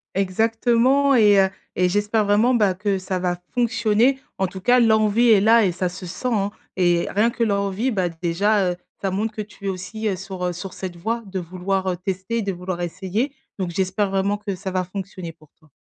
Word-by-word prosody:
Exactement 230 +8 +2
et 210 -5 +6
heu 190 0 +4 0.3
et 180 0 +3
j'espère 205 +3 +1
vraiment 215 +5 +3
ben, 205 -5 +3
que 200 +1 -1
ça 185 0 -3
va 180 -1 -1 0.2
fonctionner. 240 +1 +2 0.2
En 190 - +2
tout 190 +1 -8
cas 245 +7 +4
l'envie 220 0 +4
est 215 -3 +7
là 225 +1 +5
et 185 - +2
ça 180 +1 -2
se 180 +1 -7
sent, 250 +8 -3
hein 200 -1 0 0.3
et 175 -2 +2
rien 215 +4 +3
que 235 0 -2
l'envie, 200 +3 0
bah, 190 -5 0
déjà, 180 +4 +1
heu, - - -4 0.3
ça 195 - -1
montre 215 +4 -2
que 215 - -3
tu 205 -1 -11
es - - 0
aussi 195 +3 -3
sur, 190 -1 -5
heu, 180 - -1
sur 180 +2 -7
cette 185 -2 -6
voie 225 +7 -2
de 195 -1 -6
vouloir, 185 +2 -2
heu, 180 - -4
tester, 190 +5 -3
de 200 -2 -2
vouloir 180 0 -5
essayer. 190 - -2 0.3
Donc 185 -2 -1
j'espère 190 +3 0
vraiment 195 +1 0
que 205 -2 -4
ça 190 +1 -5
va 185 0 0
fonctionner 185 -2 -7
pour 155 -1 -22
toi. 155 - -25
195 Hz, 210 wpm, -22 LUFS, 185-220 Hz, 0.3 s, est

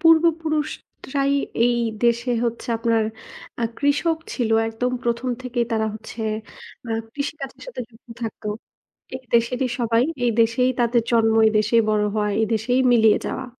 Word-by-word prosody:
পূর্ব 325 0 +6 0.2
পুরুষরাই 295 -3 -2 0.3
এই 240 0 +3 0.3
দেশে 235 +1 +2
হচ্ছে 235 0 -3
আপনার 230 -1 +2 0.6
আ - - 0 0.2
কৃষক 295 +3 +1 0.2
ছিল 235 -4 -1 0.2
একদম 245 +3 -2
১ম 235 +2 -1
থেকেই 240 -1 -1
তারা 220 -1 +1
হচ্ছে 220 +1 -9 0.7
আ - - -4 0.2
কৃষিকাজের 280 -1 -5
সাথে - - -6
যুক্ত 230 0 -23
থাকতো। 225 -1 -5 0.7
এই 260 - -8
দেশেরই 245 +3 +2
সবাই। 235 0 +2 0.2
এই 235 - +3
দেশেই 235 +3 +2
তাদের 235 0 +3
জন্ম, 225 -1 +4
এই 220 - +3
দেশেই 220 +2 +3
বড় 210 -1 +2
হওয়া। 210 -1 0
এই 220 - +3
দেশেই 240 +4 +1
মিলিয়ে 220 -3 +5
যাওয়া। 260 - -4
235 Hz, 150 wpm, -22 LUFS, 225-260 Hz, 0.7 s, পূর্ব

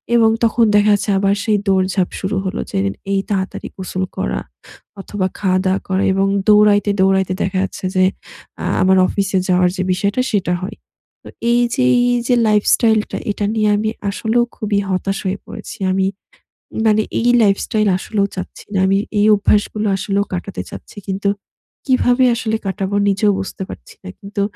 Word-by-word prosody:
এবং 225 -1 +5
তখন 230 +1 +3
দেখা 210 0 +4
যাচ্ছে 205 +1 -2
আবার 195 0 +2
সেই 215 -1 +2
দৌড়ঝাঁপ 190 -1 +1
শুরু 195 +1 -2
হলো 190 - -3
যে - - -2 0.3
এই 195 - +2
তাড়াতাড়ি 190 -2 -3
গোসল 185 0 -3
করা 60 0 -1 0.6
অথবা 195 -1 -2
খাওয়া 185 -2 +1
দাওয়া 190 +1 +1
করা 190 +1 +1
এবং 195 +1 +1 0.2
দৌড়াইতে, 210 -1 +5
দৌড়াইতে 190 -1 +2
দেখা 190 0 -2
যাচ্ছে 195 - -5
যে 185 - +4 0.6
আ - - -2 0.2
আমার 190 0 +4
অফিসে 195 0 -1
যাওয়ার 180 0 +3
যে 185 - 0
বিষয়টা 200 +6 0
সেটা 195 -5 0
হয়। 185 - -6 0.5
তো - - -11 0.2
এই 240 0 +3
যে 260 - +1 0.3
এই 245 - +2
যে 250 - +3
লাইফস্টাইল 215 +1 +3
টা - - -3
এটা 205 0 -2
নিয়ে 215 -1 +2
আমি 215 +1 -1 0.2
আসলেও 225 +4 +1
খুবই 205 -1 0
হতাশ 195 +1 -1
হয়ে 190 +1 -1
পড়েছি। - - -9
আমি 190 0 +1 0.8
মানে 215 0 +4 0.2
এই 240 - +2
লাইফস্টাইল 215 +1 +1
আসলেও 200 +1 -1
চাচ্ছি 185 - -7
না। 195 - +1
আমি 195 +1 +3 0.2
এই 205 - +4
অভ্যাস 205 0 +3
গুলো 215 0 -1
আসলেও 200 +1 0
কাটাতে 185 +2 -4
চাচ্ছি - - -11
কিন্তু 195 +1 -1 0.6
কিভাবে 255 -1 +3
আসলে 220 -2 -1
কাটাবো 195 +1 -2
নিজেও 205 +1 +2
বুঝতে 195 0 -5
পারছি 60 - -11
না - - -8
কিন্তু 200 +1 -5
200 Hz, 170 wpm, -18 LUFS, 190-215 Hz, 0.8 s, এবং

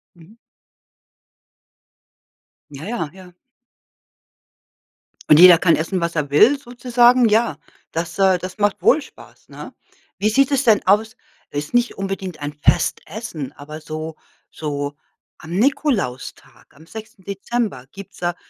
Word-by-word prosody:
Mhm. 175 +6 -19 2.3
Ja, 145 +1 -9
ja, 180 -9 -3
ja. 185 -1 -15 2.0
Und 150 - +7
jeder 180 -1 +9
kann 165 -1 +3
essen, 175 +4 -2
was 170 0 -2
er 150 -3 -1
will 230 - +5
sozusagen. 245 -1 +3
Ja, 215 -7 +1 0.3
das, 165 +2 -5
äh 190 -1 +4
das 185 +2 -8
macht 205 -1 0
wohl 305 - +4
Spaß, - - -17
ne? - - -10 0.4
Wie 210 - +1
sieht 270 +5 +2
es 275 -1 +1
denn 225 -5 +3
aus? 215 +4 +2 0.3
Es 145 +1 -4
ist - - -17
nicht 240 0 +1
unbedingt 195 -3 -5
ein 145 0 -4
Festessen, 160 - -2
aber 150 +2 -10
so 155 +1 -6 0.4
so 145 -2 -4 0.4
am 160 - -12
Nikolaustag, 235 - -2
am 155 +3 -17
6. 215 0 -11
Dezember 200 - -3
gibt's 200 0 -12
da 175 -1 -2
190 Hz, 135 wpm, -20 LUFS, 155-225 Hz, 2.3 s, jeder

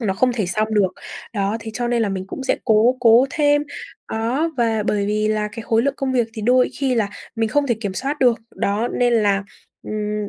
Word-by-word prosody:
nó 195 -5 -1
không 250 +4 +2
thể 215 -6 -1
xong 215 +4 -1
được. 200 -3 +3 0.5
Đó, 200 +2 0
thế 220 - -6
cho 240 0 -2
nên 235 -1 +1
là 210 - 0
mình 190 -1 -3
cũng 270 - -6
sẽ - - +1
cố 230 +2 +4
cố 235 +2 +6
thêm. 290 -1 +2 0.5
Đó, 245 +9 0
và 225 -3 +1
bởi 200 -1 0
vì 215 +1 0
là 215 -1 0
cái 230 - -7
khối 225 +1 +1
lượng 280 0 0
công 265 -1 -1
việc 240 -3 +1
thì 215 - -6
đôi 250 +2 +3
khi 265 -2 +1
là 220 -4 +1 0.3
mình 225 -1 +1
không 290 +4 +1
thể 235 - +2
kiểm 200 -4 -3
soát 280 +7 -2
được, 245 -3 +4 0.2
đó, 210 +4 0
nên 245 -1 +1
là, 205 -3 +2 0.4
ừm, 210 -1 -3
225 Hz, 235 wpm, -21 LUFS, 210-250 Hz, 0.5 s, cố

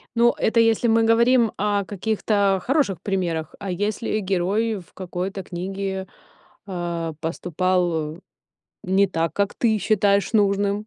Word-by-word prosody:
Ну, 235 +1 +4
это 230 +1 +2
если 225 +1 +3
мы 225 0 +4
говорим 235 0 +4
о 205 -1 0
каких-то 200 -1 0
хороших 250 - +1
примерах. 175 -5 -2
А 200 -2 -4
если 210 +3 -1
герой 200 +3 0
в 175 - -17
какой-то 185 +1 -5
книге, 190 +1 -4 0.6
а, 170 -3 -3
поступал 170 -1 -1 0.7
не 190 +2 +3
так, 165 -2 -1
как 200 0 0
ты 220 -3 +1
считаешь 200 0 +2
нужным, 205 0 +1
195 Hz, 125 wpm, -23 LUFS, 180-215 Hz, 0.7 s, Ну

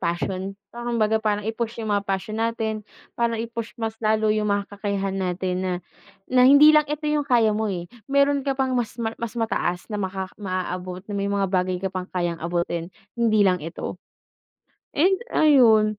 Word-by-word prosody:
passion 185 +2 -2 0.2
so 240 - -8
kumbaga 220 -2 +2
parang 210 -1 0
i-push 230 +1 -3
yung 220 - -4
mga 200 0 +1
passion 195 +2 -3
natin, 225 -1 -1 0.3
parang 230 -1 0
i-push 230 0 -5
mas 225 0 -2
lalo 215 0 +3
yung 210 -1 +1
mga 200 0 -1
kakayahan 195 -1 -2
natin 185 -1 -1
na 185 - 0 0.6
na 250 0 +5
hindi 285 +3 +8
lang 305 0 +5
ito 300 +1 -4
yung 300 -1 +1
kaya 235 -5 +3
mo, 220 - 0
eh, 175 -1 -5 0.2
meron 280 0 +3
ka 275 - +1
pang 265 -1 0
mas 240 -2 -1
ma 225 -1 -2
mas 230 -2 -4
mataas 180 -6 -1
na 210 - -3
maka 190 -1 -3
maaabot 185 -2 -4
na 205 - -3
may 200 0 -1
mga 200 -1 +1
bagay 185 -1 0
ka 190 - -1
pang 185 0 -5
kayang 175 -2 -1
abutin 170 0 -2 0.2
hindi 225 -2 +3
lang 180 -5 +3
ito. 165 +2 -5 1.0
And 375 +6 +4
ayun, 245 -8 +6
215 Hz, 185 wpm, -24 LUFS, 185-235 Hz, 1.0 s, hindi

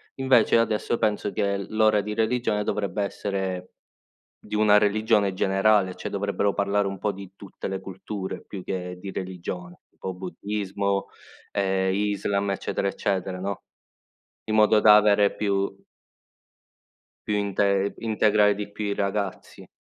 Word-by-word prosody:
Invece 130 -4 +4
adesso 115 +1 0
penso 105 -2 0
che 100 0 0
l 100 - -6
l'ora 110 -1 +4
di 105 +1 -3
religione 110 -1 0
dovrebbe 105 0 -1
essere 95 -2 -3 0.7
di - - -12
una 105 -1 +5
religione 105 -1 +2
generale, 95 0 +2
cioè - - -5
dovrebbero 100 0 0
parlare 100 0 +1
un 95 -1 -5
po' 105 - 0
di 95 -1 -10
tutte 100 -1 -8
le 95 0 -3
culture 95 +1 -6
più 95 -3 -8
che 90 -1 -4
di 95 +1 -7
religione, 90 -1 -6
tipo 95 - -6
buddismo, 100 +1 -3 0.4
ehm, 95 -1 +1
Islam, 100 -1 0
eccetera 100 0 -2
eccetera, 95 -2 -2
no, 100 0 -4 0.9
in 110 - 0
modo 110 0 +5
da 105 -1 +8
avere 105 -1 +4
più 100 -1 -1 1.5
più 105 - 0
inte 100 0 +1
integrare 105 -2 +3
di 105 0 -6
più 105 +1 -5
i 100 0 -1
ragazzi. 100 -1 -3
100 Hz, 140 wpm, -25 LUFS, 95-105 Hz, 1.5 s, da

